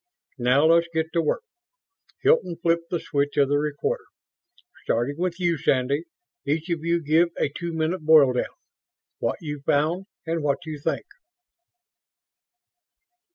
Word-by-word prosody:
"Now 125 Hz, +5 st, +4 dB
let's 170 Hz, +1 st, +5 dB
get 160 Hz, 0 st, -2 dB
to 170 Hz, -, +2 dB
work." 165 Hz, -, -1 dB, 0.8 s
Hilton 440 Hz, -, +3 dB
flipped 170 Hz, 0 st, 0 dB
the 175 Hz, -, -1 dB
switch 145 Hz, -1 st, -1 dB
of 140 Hz, -2 st, +4 dB
the 145 Hz, 0 st, +2 dB
recorder. 290 Hz, -, -2 dB, 0.8 s
"Starting 120 Hz, +5 st, 0 dB
with 180 Hz, 0 st, -1 dB
you, 170 Hz, -4 st, +1 dB
Sandy, 140 Hz, +5 st, +1 dB, 0.4 s
each 165 Hz, +4 st, -1 dB
of 165 Hz, -2 st, -2 dB
you 170 Hz, 0 st, +1 dB
give 160 Hz, +4 st, +3 dB
a -, -, +1 dB
two 170 Hz, +4 st, -5 dB
minute 160 Hz, +2 st, -1 dB
boil 155 Hz, -4 st, +6 dB
down. 125 Hz, -, 0 dB, 0.7 s
What -, -, -1 dB
you 150 Hz, -2 st, -4 dB
found 160 Hz, +7 st, +1 dB, 0.2 s
and 165 Hz, 0 st, -1 dB
what 145 Hz, +4 st, -1 dB
you 155 Hz, -2 st, -6 dB
think." 160 Hz, -, -2 dB
160 Hz, 145 wpm, -25 LUFS, 145-170 Hz, 0.8 s, boil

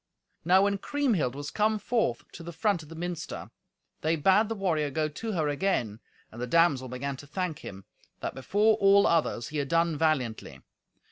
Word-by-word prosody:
Now 185 Hz, +4 st, +5 dB
when 200 Hz, 0 st, +1 dB
Kriemhild 225 Hz, -, 0 dB
was 145 Hz, 0 st, -6 dB
come 215 Hz, +1 st, +1 dB
forth 220 Hz, -, -1 dB
to -, -, -10 dB
the 170 Hz, +1 st, -7 dB
front 175 Hz, +2 st, 0 dB
of 155 Hz, -, -14 dB
the 165 Hz, -, -9 dB
minster, 175 Hz, 0 st, -5 dB, 0.5 s
they 160 Hz, +2 st, +1 dB
bade 190 Hz, +8 st, +3 dB
the 225 Hz, -, -2 dB
warrior 165 Hz, -7 st, 0 dB
go 155 Hz, +2 st, -1 dB
to 215 Hz, +9 st, -5 dB
her 160 Hz, -5 st, 0 dB
again, 145 Hz, -, -1 dB, 0.3 s
and 120 Hz, -, -9 dB
the 125 Hz, -, -2 dB
damsel 145 Hz, -3 st, +3 dB
began 135 Hz, +2 st, -4 dB
to 145 Hz, -, -12 dB
thank 180 Hz, 0 st, -3 dB
him, 95 Hz, 0 st, -10 dB, 0.3 s
that -, -, -4 dB
before 205 Hz, -, +2 dB
all 200 Hz, 0 st, +5 dB
others 155 Hz, -8 st, +1 dB
he 155 Hz, -, -5 dB
had 140 Hz, -1 st, -1 dB
done 165 Hz, +1 st, +2 dB
valiantly. 140 Hz, -8 st, -1 dB
165 Hz, 190 wpm, -28 LUFS, 140-195 Hz, 0.5 s, Now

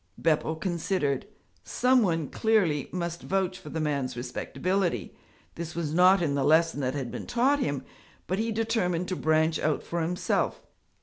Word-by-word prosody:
Beppo 160 Hz, 0 st, +1 dB
considered. 165 Hz, -4 st, -1 dB, 0.4 s
Some 255 Hz, 0 st, +3 dB
one, 165 Hz, -7 st, +1 dB
clearly, 190 Hz, -11 st, +1 dB
must 170 Hz, -1 st, -3 dB
vouch 190 Hz, -1 st, -1 dB
for 150 Hz, -, -10 dB
the 160 Hz, -, -3 dB
man's 140 Hz, -5 st, -1 dB
respectability. 170 Hz, +9 st, -2 dB, 0.4 s
This 170 Hz, 0 st, -6 dB
was 160 Hz, -3 st, -2 dB
not 180 Hz, +2 st, +5 dB
in 145 Hz, -4 st, 0 dB
the 140 Hz, -1 st, 0 dB
lesson 160 Hz, 0 st, +3 dB
that 130 Hz, 0 st, -1 dB
had 130 Hz, -4 st, -3 dB
been -, -, -6 dB
taught 265 Hz, +4 st, +2 dB
him, 145 Hz, -, -2 dB, 0.4 s
but 185 Hz, +3 st, -2 dB
he 225 Hz, +1 st, 0 dB
determined 215 Hz, -6 st, 0 dB
to 185 Hz, -, -1 dB
branch 160 Hz, -1 st, +2 dB
out 155 Hz, -1 st, 0 dB
for 170 Hz, 0 st, -3 dB
himself. 175 Hz, +2 st, -1 dB
170 Hz, 165 wpm, -27 LUFS, 150-190 Hz, 0.4 s, not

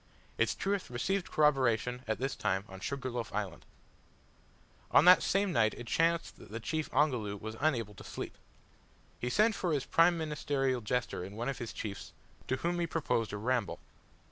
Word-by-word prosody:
Its -, -, +1 dB
truth 200 Hz, 0 st, -1 dB
received 175 Hz, +11 st, -1 dB
corroboration 125 Hz, -5 st, +2 dB
at 110 Hz, -, 0 dB
this 135 Hz, +1 st, -2 dB
time 95 Hz, +2 st, -1 dB
on 95 Hz, 0 st, -10 dB
Sugar 130 Hz, +4 st, -3 dB
loaf 120 Hz, -2 st, -4 dB
Island. 100 Hz, -5 st, -4 dB, 1.2 s
On 150 Hz, -, +6 dB
that 180 Hz, +1 st, +9 dB
same 200 Hz, 0 st, +1 dB
night 110 Hz, -2 st, +3 dB
it 120 Hz, -, -8 dB
chanced 165 Hz, +6 st, +1 dB
that -, -, -14 dB
the 115 Hz, +2 st, -5 dB
chief 155 Hz, +7 st, -2 dB
Ongoloo 125 Hz, -8 st, +1 dB
was 110 Hz, +2 st, -6 dB
unable 115 Hz, -9 st, 0 dB
to 95 Hz, -, -12 dB
sleep. -, -, -6 dB, 0.8 s
He 125 Hz, -, -2 dB
sent 215 Hz, -, +4 dB
for 180 Hz, -4 st, -1 dB
his 140 Hz, -3 st, 0 dB
prime 170 Hz, +1 st, +4 dB
ministerial 145 Hz, -5 st, -1 dB
jester 120 Hz, -3 st, -1 dB
and 100 Hz, +3 st, -8 dB
one 120 Hz, +4 st, -2 dB
of 135 Hz, -, -4 dB
his 120 Hz, -2 st, -4 dB
chiefs, 100 Hz, -2 st, -6 dB, 0.3 s
to 130 Hz, -, +1 dB
whom 175 Hz, +6 st, -1 dB
he 170 Hz, -, 0 dB
proposed 140 Hz, -9 st, 0 dB
a 105 Hz, -, -3 dB
ramble. 120 Hz, 0 st, 0 dB
130 Hz, 180 wpm, -32 LUFS, 110-160 Hz, 1.2 s, that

